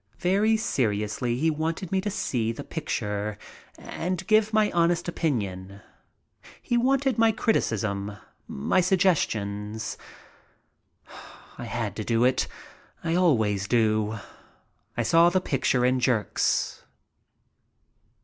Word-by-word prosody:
Very 200 +5 +2
seriously 120 - -1
he 160 +4 +2
wanted 160 +3 -3
me 190 -1 +1
to 205 - -2
see 120 - -1
the 115 - -7
picture 105 -9 -3 0.4
and 180 +1 -4
give 215 0 +3
my 215 -1 +3
honest 170 0 +1
opinion. 100 - -3 0.8
He 240 - -2
wanted 265 0 +2
my 225 0 +5
criti 220 +1 +1
cism, 100 -2 -3 0.3
my 70 - +1
suggestions. 110 - 0 1.6
I 120 - -5
had 115 -4 -3
to 110 - -3
do 115 +2 +1
it. 130 0 +2 0.6
I 165 - -1
always 110 - +2
do. 110 -2 +1 0.8
I - - +1
saw 170 +1 +5
the 185 +1 +2
picture 130 -6 +1
in 130 0 +2
jerks. 120 -4 0
130 Hz, 115 wpm, -26 LUFS, -, 1.6 s, my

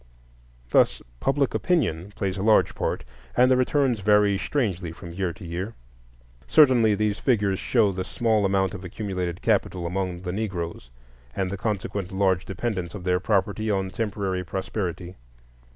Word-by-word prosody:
Thus - - +4 0.2
public 135 - +1
opinion 105 - 0
plays 95 -2 -2
a 95 - -4
large 110 +1 +4
part, - - -2 0.3
and 125 +1 +5
the - - +6
returns 130 -2 +2
vary 105 0 +4
strangely 95 - -1
from 85 +1 -10
year 95 0 -1
to 90 - -11
year. 90 +7 -4 0.7
Certainly 120 - +5
these 105 0 0
figures 100 -6 +1
show 110 -5 +2
the 95 -1 -3
small 110 +2 +1
amount 95 -1 +1
of 95 -1 -7
accumulated 90 -2 -4
capital 95 -5 +1
among 90 0 -2
the 90 -1 -3
Negroes, 90 - -4 0.5
and 95 -1 -1
the - - -2
consequent 100 -2 -3
large 95 -2 +1
dependence 95 -4 -3
of 95 - -7
their 90 0 +2
property 105 +2 0
on 95 -2 0
temporary 100 -3 -2
prosperity. 90 -1 -4
100 Hz, 150 wpm, -25 LUFS, 90-110 Hz, 0.7 s, the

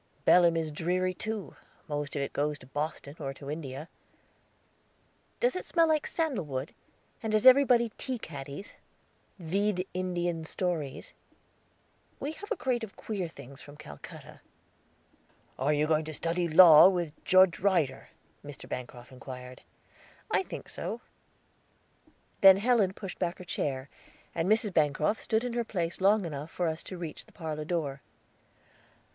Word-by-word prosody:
"Belem 170 -2 +6
is 160 -1 -2
dreary 180 +4 0
too; 215 +1 -5 0.3
most 145 -1 -3
of 140 - 0
it 140 - -5
goes 150 +1 -1
to 130 - -15
Boston, 145 +1 -4
or 135 -2 -4
to 140 0 -7
India." 150 -1 -6 1.5
"Does - - +2
it 370 - -3
smell 330 -2 +3
of 305 -1 +1
sandal 310 - -1
wood? 135 -1 -5 0.5
And 220 -2 -2
has 215 +2 +2
everybody 255 -3 +7
tea 260 -2 -3
caddies? 145 -1 -8 0.6
Vide 190 +2 -1
Indian 175 -2 -2
stories." 160 -4 -3 1.1
"We 290 - -3
have 410 +8 -10
a - - +2
crate 245 -3 -1
of 215 - -8
queer 200 -5 -4
things 140 -3 -12
from 145 0 -13
Calcutta." 70 - -11 1.2
"Are 135 +3 +2
you 150 0 +2
going 155 0 +1
to 155 -1 -5
study 170 +2 -1
law 165 0 +9
with 175 -5 -3
Judge 185 -2 +5
Ryder?" 175 -9 +1 0.3
Mr. 145 -1 -10
Bancroft 125 0 -7
inquired. 125 -1 -9 0.7
"I - - +3
think - - -8
so." - - -5 1.4
Then 195 -1 +9
Helen 210 -3 +2
pushed 195 -2 -8
back 175 0 -1
her 185 - -9
chair; 135 -5 -2 0.5
and 165 +3 -1
Mrs. 215 -2 +2
Bancroft 155 +6 +1
stood 220 +1 0
in 245 -1 -3
her 240 0 0
place 175 -6 -3
long 200 +1 +4
enough 150 -1 -5
for 175 +1 -1
us 160 0 -2
to 185 - -7
reach 170 -3 -7
the - - -19
parlor 155 -3 -5
door. 150 -5 -2
170 Hz, 150 wpm, -29 LUFS, 145-200 Hz, 1.5 s, law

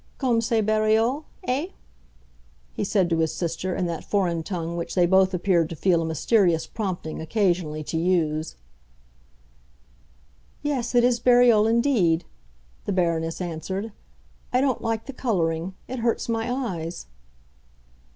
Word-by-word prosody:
"Comme 245 -4 +1
c'est 230 -1 +1
bariolé, 220 +6 +2 0.2
eh?" 275 +7 0 1.1
he - - -3
said 195 -2 +2
to 165 -1 0
his 160 -1 +1
sister 175 +2 -2
in 180 - -1
that 170 -2 -4
foreign 180 -5 0
tongue 170 -1 -4
which 170 0 -4
they 180 -2 +4
both 190 +1 +4
appeared 175 -3 +1
to 165 - -6
feel 170 0 +2
a - - -2
mysterious 165 +1 +2
prompting 185 -8 -4
occasionally 170 -4 0
to 160 +2 -3
use. 160 -3 0 2.1
"Yes, 260 -5 -2
it 240 - +5
is 245 -1 +3
bariolé 240 -3 +5
indeed," 225 -9 +2 0.6
the - - -1
Baroness 165 -3 0
answered. 190 +5 -4 0.6
"I 250 - +3
don't 265 -3 +1
like 225 -1 -2
the 275 - -7
coloring; 180 -7 -1
it 255 0 -5
hurts 230 0 0
my 225 +1 -1
eyes." 180 -10 -4
190 Hz, 140 wpm, -24 LUFS, 165-230 Hz, 2.1 s, it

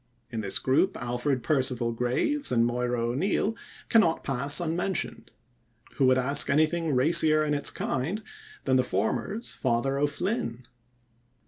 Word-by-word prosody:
In 110 - -3
this 100 -2 0
group 145 +9 +1
Alfred 125 +2 -2
Perceval 130 -5 0
Graves 125 - -1
and 115 -2 +3
Moira 120 0 -1
O'Neill 190 - 0 0.3
cannot 195 -8 +3
pass 140 +3 +2
unmentioned. 175 +3 -2 0.7
Who 135 - +3
would 130 0 +4
ask 140 +3 +3
anything 155 +1 +1
racier 155 +3 +3
in 150 -1 0
its 145 -1 +2
kind 165 +12 -3 0.4
than 130 -1 +2
the 130 - +3
former's 125 - -2
"Father 130 +2 -1
O'Flynn"? 145 - -2
135 Hz, 130 wpm, -27 LUFS, 125-160 Hz, 0.7 s, would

